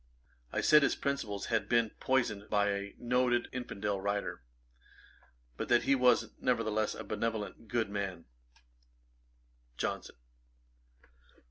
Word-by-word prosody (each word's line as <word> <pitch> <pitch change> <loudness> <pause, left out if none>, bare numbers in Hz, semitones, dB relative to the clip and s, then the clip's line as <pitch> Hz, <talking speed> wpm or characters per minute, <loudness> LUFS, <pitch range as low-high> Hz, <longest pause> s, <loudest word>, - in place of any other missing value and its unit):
I - - 0
said 150 0 +7
his 140 - +2
principles 140 -8 -2
had - - +1
been 115 -2 +3
poisoned 115 -6 0
by 105 -1 +2
a 100 0 -4
noted 120 0 +1
infidel 105 -5 -3
writer, 100 -8 -2 1.2
but - - -4
that 120 -1 +5
he 140 - +3
was, 125 -3 +4
nevertheless, 110 -3 0
a 110 - -6
benevolent 110 +1 -3
good 115 -2 -1
man. 95 -4 -3 1.5
JOHNSON. - - -3
110 Hz, 115 wpm, -32 LUFS, 100-125 Hz, 1.5 s, said